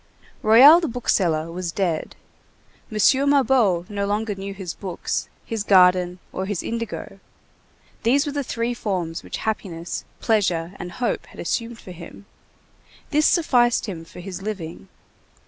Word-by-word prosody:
Royol 265 +10 +9
the 330 - -1
bookseller 170 - 0
was 175 0 -4
dead. 170 -4 -2 0.8
M. 215 - -4 0.3
Mabeuf 250 -11 +3
no 200 -1 -2
longer 210 +1 -1
knew 195 0 -6
his 190 -3 -6
books, 185 -4 -4 0.2
his 225 -3 -3
garden, 180 -2 +4 0.2
or 190 +1 -3
his 205 -4 -3
indigo: 230 -1 -5 0.8
these 275 +6 +3
were 290 - -2
the 285 0 -2
three 235 -1 -2
forms 180 -8 -3
which - - -6
happiness, 180 -6 -3 0.2
pleasure, 180 -6 +1
and 175 0 -6
hope 240 +3 -2
had - - -15
assumed 230 +6 -2
for 185 - -11
him. 175 +3 -11 0.9
This 305 0 +4
sufficed 245 -8 +3
him 180 -6 -6
for 165 - -12
his 190 0 -7
living. 175 - -6
200 Hz, 145 wpm, -23 LUFS, 175-230 Hz, 0.9 s, Royol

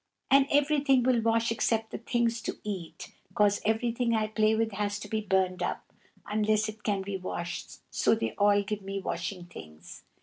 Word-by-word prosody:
And 275 0 +6
everything 285 -3 +3
will 245 -2 +3
wash 230 0 +2
except 225 -1 0
the - - -5
things 235 0 0
to - - -4
eat, 190 -6 -6 0.2
'cause 205 -1 +3
everything 230 +1 +1
I 215 -1 +1
play 215 0 +2
with 225 0 0
has 205 0 -2
to 210 - -7
be 220 +1 -1
burned 190 -2 +1
up, - - -4 0.3
unless 215 0 +1
it 215 0 -8
can 200 -3 -1
be 195 0 -3
washed, 175 -2 -6
so - - +3
they 115 -1 -2
all 205 0 +3
gave 210 0 -4
me 195 0 -4
washing 180 0 -4
things. 80 - -12
215 Hz, 180 wpm, -29 LUFS, 195-230 Hz, 0.3 s, And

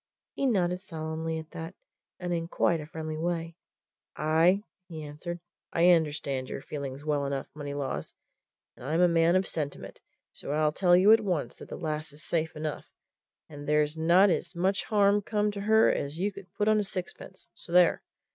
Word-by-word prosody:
He 275 - 0
nodded 180 -6 +1
solemnly 160 -2 -4
at 160 0 -8
that 165 +3 -7 0.4
and 180 -1 -2
in 165 -1 -2
quite 170 -1 +1
a 150 - -9
friendly 155 0 -5
way. 165 0 -2 0.6
"Aye!" 165 +6 +3 0.2
he 160 -3 -7
answered. 155 +4 -6 0.3
"I 175 +2 +5
understand 145 -5 0
your - - -6
feelings 140 0 -6
well 145 -2 0
enough, 140 -1 -3
Moneylaws 145 -2 -4 0.6
and - - -14
I'm 155 +5 0
a 180 - +6
man 170 +1 +3
of 185 0 +2
sentiment, 145 -3 -5 0.3
so 145 - -5
I'll 150 0 +2
tell 175 +2 +4
you 195 +4 +6
at 225 - +8
once 180 -7 -2
that - - -11
the - - -6
lass 155 -1 -3
is 150 +3 -8
safe 160 -1 -1
enough, 155 -1 -4 0.6
and 145 -2 -10
there's 150 0 +2
not 175 +5 +5
as 175 - -2
much 190 +3 0
harm 205 -1 +3
come 210 0 0
to 200 -1 -6
her 220 +2 +5
as 145 +2 -3
you 200 +4 0
could 195 -2 -12
put 205 - 0
on 215 0 +4
a - - +1
sixpence 185 -1 -7
so 170 - -9
there! 180 -1 +5
165 Hz, 185 wpm, -28 LUFS, 150-185 Hz, 0.6 s, at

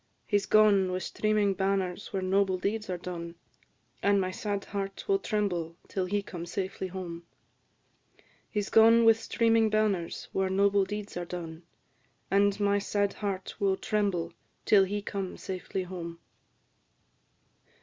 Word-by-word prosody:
"He 205 - +2
's 195 - -8
gone, 205 -3 +5
with 185 0 -2
streaming 215 -2 +1
banners, 190 0 -1
where 190 -1 -2
noble 190 0 +2
deeds 210 +3 -2
are 180 - -2
done, 170 -1 -6 0.7
And 200 0 +3
my 185 -1 -1
sad 200 +1 -3
heart 195 -1 -5
will 395 -1 +3
tremble 180 - -1
till 190 -2 -2
he 200 +2 -1
come 175 -3 -7
safely 190 +1 -3
home. 175 -2 -7 1.2
He 210 - -1
's 200 - -6
gone, 230 +1 +7
with 225 0 +6
streaming 225 -1 +2
banners, 210 -5 0
where 190 0 +1
noble 200 +1 +3
deeds 205 -1 -6
are 175 - -3
done, 170 -2 -7 0.7
And 200 +1 +3
my 205 0 +2
sad 205 0 0
heart 195 -3 -4
will 195 -1 +2
tremble 195 -7 -1 0.3
till 200 -2 +6
he 205 +1 -3
come 195 -3 -4
safely 185 0 -4
home." 175 -2 -7
195 Hz, 150 wpm, -29 LUFS, 185-205 Hz, 1.2 s, gone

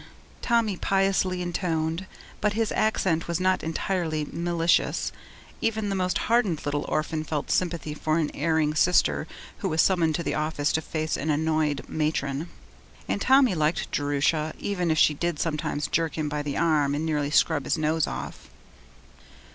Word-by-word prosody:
Tommy 230 -5 +1
piously 195 -2 +1
intoned, 170 0 -2 0.3
but 210 -1 +1
his 220 0 0
accent 190 -6 +1
was 170 0 -1
not 185 0 +2
entirely 160 -1 -2
malicious. 170 0 +1 0.5
Even 220 -2 0
the 195 - -1
most 185 -1 0
hardened 220 -9 +1
little 145 0 -1
orphan 155 0 -1
felt 150 -2 -3
sympathy 170 -4 -1
for 155 +1 0
an 155 -3 0
erring 155 -1 +1
sister 115 - +2 0.3
who - - -1
was 160 - -1
summoned 165 -2 +3
to 170 - -2
the - - -1
office 150 -1 0
to 160 - 0
face 155 -1 -2
an 155 - -3
annoyed 155 -1 0
matron; 150 0 -2 0.6
and - - -1
Tommy 265 -4 +5
liked 155 0 0
Jerusha 145 +2 0
even 180 -4 -2
if 160 - +2
she 150 - +5
did 170 +1 -2
sometimes 150 -2 -1
jerk 165 -1 -1
him 155 -1 -1
by 150 0 -2
the 145 -1 -3
arm 150 -4 +2
and 155 +2 -2
nearly 150 -3 0
scrub 145 -1 +2
his - - 0
nose 155 0 +1
off. - - -7
160 Hz, 165 wpm, -26 LUFS, 150-180 Hz, 0.6 s, Tommy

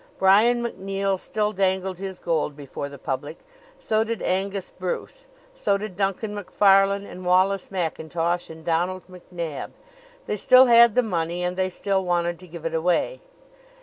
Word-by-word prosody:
Brian 220 +6 +4
MacNeill 195 -3 -2
still 210 +1 -1
dangled 190 -2 -1
his 190 -1 -6
gold 160 -3 -1
before 140 0 -6
the 140 - -10
public; 145 +3 -4 0.4
so 220 0 +1
did 225 -1 -4
Angus 195 +1 -2
Bruce; - - -5 0.3
so 200 - +1
did 205 -2 -7
Duncan 200 +2 -1
Macfarlane 200 0 +3
and 185 -2 -10
Wallace 185 +2 +2
Mackintosh 170 -1 -2
and 160 0 -11
Donald 175 +2 0
MacNab. 175 -4 -7 0.5
They 210 - -2
still 255 +5 +7
had 235 -2 +6
the 250 - +4
money 175 -4 -2
and 180 0 -1
they 185 0 0
still 190 +1 -1
wanted 175 -1 0
to 180 - -13
give 165 -1 -10
it 165 - -2
away. 175 - 0
185 Hz, 155 wpm, -24 LUFS, 170-200 Hz, 0.5 s, still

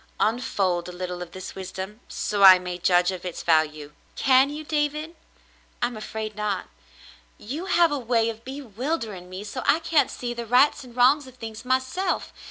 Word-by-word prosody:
'* - - -34
Unfold 190 -6 0
a - - -6
little 180 0 -5
of 175 -1 -7
this 185 +1 -8
wisdom, 190 +2 -7
so 205 -1 -2
I 190 -1 +10
may 180 0 -6
judge 180 +1 +3
of 185 -2 -7
its 180 -2 -5
value." 155 -2 +1 0.2
"Can 265 +1 +4
you, 300 +1 -6
David 300 +1 -1
.^^ - - -24 0.7
I'm 240 0 -1
afraid 215 0 -5
not. 210 -2 -2 0.7
You 290 - -6
have 345 -3 +4
a 290 - -1
way 230 -2 +1
of 225 0 -7
bewildering 245 - -4
me, 185 +2 -7
so 215 +5 -5
I - - +4
can't 325 -2 +2
see 240 -1 -4
the 235 -1 -6
rights 255 +5 +4
and 245 -2 -14
wrongs 260 +3 +4
of 255 - -14
things 225 -2 -8
myself. 260 +9 -1
225 Hz, 185 wpm, -25 LUFS, 185-265 Hz, 0.7 s, I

